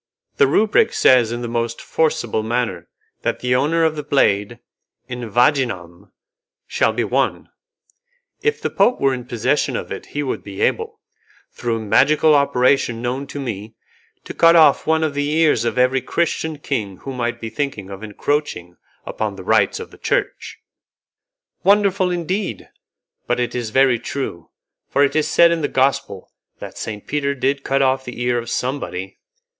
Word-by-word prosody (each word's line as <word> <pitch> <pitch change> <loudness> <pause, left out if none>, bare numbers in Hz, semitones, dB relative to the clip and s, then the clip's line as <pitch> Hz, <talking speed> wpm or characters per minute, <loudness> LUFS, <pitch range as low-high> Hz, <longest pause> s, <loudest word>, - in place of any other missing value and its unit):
The 140 - +5
rubric 215 +8 +3
says 120 -3 +4
in 120 +1 -4
the - - -3
most 115 0 -2
forcible 155 -9 -1
manner 120 +2 -2 0.3
that - - -2
the 125 0 +1
owner 150 +6 +2
of 160 -1 +2
the 150 - -3
blade, 110 -6 +1 0.5
'in 125 -2 -6
vaginam', 115 - 0 0.5
shall - - +1
be - - -1
one. - - -1 0.9
If 450 - 0
the - - -1
Pope 250 - +2
were 135 -1 +2
in 125 -2 -5
possession 120 -4 0
of - - -5
it - - -6
he 145 - -3
would 135 - -3
be 100 -1 -9
able, - - -1 0.5
through 120 -1 -2
a - - -5
magical 150 +8 +4
operation 130 -4 +2
known 130 +3 -3
to 140 +1 -7
me, 110 -4 -6 0.5
to - - -8
cut 165 0 +5
off 160 -2 +5
one 160 0 +2
of 155 -2 -1
the 145 0 -1
ears 155 -7 +2
of 120 - -2
every 130 +1 +3
Christian 160 -1 -1
king 110 -10 -3
who 135 - -5
might 120 -1 -3
be 115 -1 -6
thinking 110 -6 -4
of 95 +1 -8
encroaching 110 - -3 0.3
upon - - -3
the - - -9
rights - - +2
of 455 - -9
the - - -16
Church." - - -2 1.1
"Wonderful, 200 -2 +3
indeed! 180 +3 -3 0.6
But 120 0 0
it 120 - -1
is 120 -3 -3
very 130 0 +3
true, 130 -12 -5 0.4
for 140 - +3
it 140 - +1
is 155 - +2
said 170 0 +5
in 170 -1 0
the 145 - 0
Gospel 135 -8 -1 0.3
that - - -9
Saint 105 -2 -6
Peter 140 -1 -1
did 140 +1 -1
cut 135 0 +1
off 130 0 +1
the 125 -1 -8
ear 120 0 +1
of 120 - -7
somebody." 125 -8 -4
130 Hz, 170 wpm, -20 LUFS, 115-150 Hz, 1.1 s, The